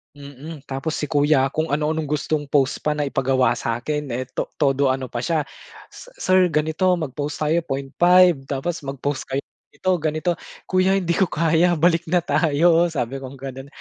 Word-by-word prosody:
Mm, 145 +1 -10
tapos 135 +3 -4
si - - -4
kuya, 145 -2 +3
kung 155 +2 -1
ano-anong 155 +1 -1
gustong 150 0 -2
pose 140 -2 +1
pa 150 0 -1
na 150 - -1
ipagawa 135 -3 +1
sa'kin 145 +6 -3
eh, 130 - -2
to - - -3
todo 140 -1 +2
ano 130 -1 -2
pa 120 - -3
siya, 155 +4 0 0.5
"si - - -12
sir, 185 -1 +3
ganito, 160 +3 0
mag-pose 145 -2 -4
tayo 155 +2 +1
0.5, 170 +5 +3
tapos 145 +6 -3
mag-pose 140 0 -3
kayo 135 +1 -2 0.2
ganito-ganito." 170 -2 -1 0.3
"Kuya, 185 +1 +2
hindi 180 -3 0
ko 185 +1 +2
kaya. 165 +2 +2
Balik 170 +1 +2
na 175 +1 +1
tayo," 165 +2 +3
sabi 135 -4 -3
kong 135 0 -9
gano'n. 135 0 -8
150 Hz, 165 wpm, -22 LUFS, 135-165 Hz, 0.5 s, kuya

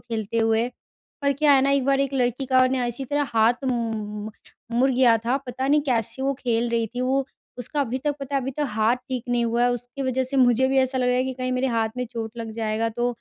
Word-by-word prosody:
खेलते 220 +1 -3
हुए 225 +1 +2 0.5
पर 280 0 +2
क्या 290 +2 +3
है 270 - +5
न 275 - +2
एक 275 -2 +1
बार 275 0 +2
एक 275 0 0
लड़की 250 +1 0
का 255 0 +4
ना 255 -1 0
इसी 240 +3 -3
तरह 290 0 -1
हाथ 230 +4 +3
उम, 220 -4 -3 0.4
मुड़ 255 +3 +3
गया 245 -3 +4
था 250 +3 +2
पता 260 +2 -3
नहीं 295 +1 +4
कैसे 235 +2 -1
वो 275 +1 +1
खेल 235 -1 +1
रही 230 -1 0
थी 245 +3 -5
वो। 265 +2 +1 0.3
उसका 285 +4 -2
अभी 255 -1 -2
तक 290 +2 -2
पता 275 0 -4
है 275 - +2
अभी 265 +1 -3
तक 295 +3 -2
हाथ 220 +2 +2
ठीक 255 -3 -3
नहीं 240 -1 +1
हुआ 235 +1 0
है 245 - +4
उसकी 245 +3 -5
वजह 260 0 0
से 265 +2 -3
मुझे 255 0 +4
भी 270 - +1
ऐसा 260 0 +2
लग 250 -1 +1
रहा 250 - +2
है 255 - +2
कि 260 0 -3
कहीं 255 0 -3
मेरे 255 +1 0
हाथ 225 -2 0
में 250 - -1
चोट 225 -2 -4
लग 225 -1 -5
जाएगा 220 0 -1
तो 240 +2 -1
250 Hz, 260 wpm, -24 LUFS, 230-265 Hz, 0.5 s, है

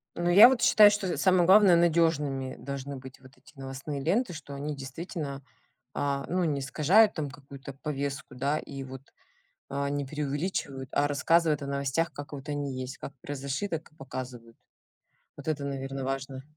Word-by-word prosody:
Ну, 175 0 0
я 200 +7 +10
вот 260 -2 0
считаю, 210 -3 +7
что 205 -3 -1
самое 185 -2 +4
главное- 190 0 +7
надежными 155 -6 +1
должны 140 0 -6
быть 130 0 -11
вот 130 +1 -17
эти - - -21
новостные 135 +2 -6
ленты, 210 - +1
что 150 -3 -9
они 145 +2 -4
действительно, 140 +1 -6 0.5
а, 140 -1 -1
ну, 180 +1 0
не 150 -4 0
искажают 165 +11 +4
там 150 -4 -3
какую-то 140 0 -11
повестку, 140 -1 -5
да, 140 +4 0
и 135 0 -7
вот, 130 0 -9 0.7
а, 140 0 -2
не 145 0 -2
преувеличивают, 145 -1 -3
а 145 - +2
рассказывают 155 +1 +2
о - - -4
новостях, 140 +4 -1
как 145 +1 -9
вот 140 0 -8
они 145 -2 -3
есть, 130 +1 -6
как 140 - -8
произошли, 140 +7 -4
так 160 -3 -5
и - - -25
показывают. 125 -4 -8 0.8
Вот 145 - -11
это, 145 -2 -2
наверно, 135 -1 -4
важно. 135 0 -4
140 Hz, 170 wpm, -28 LUFS, 135-165 Hz, 0.8 s, я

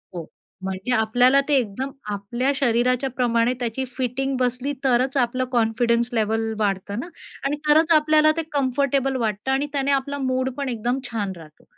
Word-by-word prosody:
हो. 170 -2 -5 0.4
म्हणजे 190 +5 -4
आपल्याला 245 +4 +4
ते 295 - +3
एकदम 255 +2 -2 0.2
आपल्या 240 +7 -1
शरीराच्या 250 0 +1
प्रमाणे 235 0 +2
त्याची 240 +2 -2
फिटिंग 265 +1 -1
बसली, 250 +2 -1
तरचं 260 +1 +2
आपलं 255 +1 0
कॉन्फिडन्स 235 0 +1
लेव्हल 225 0 0
वाढतं 200 0 -1
ना 280 - -5 0.4
आणि 290 +2 0
तरचं 320 +2 +5
आपल्याला 310 0 +4
ते - - +1
कम्फर्टेबल 270 -1 0
वाटतं. 225 0 -1
आणि 275 +2 +1
त्याने 280 0 0
आपला 280 +1 0
मूडपण 260 +1 -2
एकदम 240 +2 -1
छान 205 -4 -2
राहतो. 155 -3 -15
250 Hz, 155 wpm, -23 LUFS, 225-270 Hz, 0.4 s, तरचं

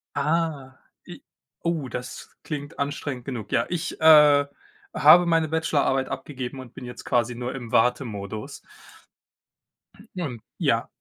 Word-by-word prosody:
Ah, 145 -3 -1 0.3
i - - -11 0.4
oh, 165 -5 -1
das 125 +1 -7
klingt 145 -1 -6
anstrengend 140 -3 -4
genug. 125 -6 -6
Ja, 115 - +2
ich, 170 -1 -4
äh, 150 -2 +7 0.5
habe 170 +4 +7
meine 165 -2 +2
Bachelorarbeit 145 -4 +1
abgegeben 130 -1 -6
und 130 -3 -11
bin 125 - -8
jetzt 125 - -9
quasi 120 -1 0
nur 120 +2 -5
im 120 -4 -8
Wartemodus. 110 -4 -1 1.6
Und 140 -11 -5 0.2
ja. - - +1
135 Hz, 125 wpm, -24 LUFS, 125-155 Hz, 1.6 s, äh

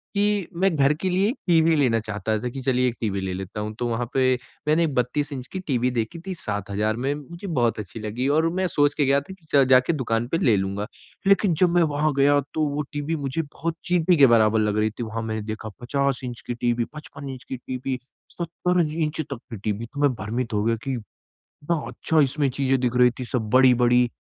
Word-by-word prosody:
कि 205 -2 +1
मैं 180 0 +1
घर 140 0 +4
के 190 - 0
लिए 185 +3 +2
एक 250 - -2
टीवी 165 -1 +4
लेना 125 -6 +3
चाहता 110 0 -2
था 125 +3 -3
कि 135 +2 -6
चलिए 125 -1 +2
एक 120 - -2
टीवी 100 -4 -1
ले 95 -1 -3
लेता 95 +2 -6
हूँ 105 +1 -3
तो 120 - 0
वहाँ 120 +1 -1
पे 130 -2 +3 0.3
मैंने 160 +2 +4
32 140 +2 -1
इंच 130 -2 -6
की 190 - -4
टीवी 125 -2 +1
देखी 115 +6 -3
थी 190 - -3
7,000 105 - -2
में 130 +4 -1
मुझे 170 +7 -9
बहुत 120 - +1
अच्छी 105 +2 -7
लगी 110 +5 -2
और 165 +1 +3
मैं 185 0 0
सोच 145 -2 +2
के 145 - +1
गया 140 +1 +4
था 165 +7 -10
कि 185 -4 -20
च 140 -1 +7
जाके 130 +5 +5
दुकान 120 -4 -1
पे 165 - 0
ले 120 - +3
लूँगा। 100 +2 -2 0.4
लेकिन 195 -2 +4
जब 175 +3 +3
मैं 175 - +5
वहाँ 150 -1 +1
गया 145 +1 +5
तो 155 - +1
वो 145 +1 -2
टीवी 145 +2 -2
मुझे 140 +1 -2
बहुत 165 +2 -4
चींटी 175 -1 +3
के 140 - +8
बराबर 110 -2 +4
लग 105 -1 +1
रही 105 0 +2
थी, 110 +3 -6
वहाँ 115 0 -4
मैंने 110 -1 -3
देखा 110 +1 -5
50 140 +1 0
इंच 120 -1 -6
की - - -1
टीवी 120 0 0
55 140 -2 -9
इंच 130 -2 -7
की 130 - -6
टीवी 130 +1 -4 0.4
70 175 +1 0
इंच 160 -1 -1
तक 140 -4 -6
के 115 - -5
टीवी 105 +3 -3
तो 145 - -6
मैं 145 - +5
भ्रमित 115 +4 -3
हो 105 0 +1
गया 115 +1 +2
कि - - 0 0.8
हाँ, 165 -3 +1
अच्छा 160 -1 +1
इसमें 140 0 +2
चीज़ें 135 0 +1
दिख 125 -1 0
रही 125 0 +6
थी 125 - -4
सब 115 -3 -3
बड़ी-बड़ी। 125 -1 +5
130 Hz, 230 wpm, -24 LUFS, 115-155 Hz, 0.8 s, के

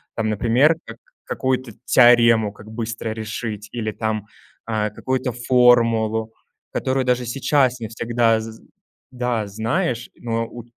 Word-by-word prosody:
Там, 110 -1 -1
например, 120 +9 +3
как - - -10 0.3
какую-то 130 -2 -2
теорему 120 -3 +5
как 105 +1 -14
быстро 115 0 -4
решить 110 -1 -5
или 110 -2 -3
там, 110 -1 -3 0.4
а, 110 -2 -1
какую-то 130 +4 -2
формулу, 115 -3 +3 0.4
которую 130 0 -1
даже 125 0 +1
сейчас 130 +1 +1
не 110 - -5
всегда 115 0 +1
з 110 0 -9 0.5
да, 125 -4 -2
знаешь, 115 - -2
но 115 -1 -3
у 120 0 -10
115 Hz, 130 wpm, -21 LUFS, 110-125 Hz, 0.5 s, теорему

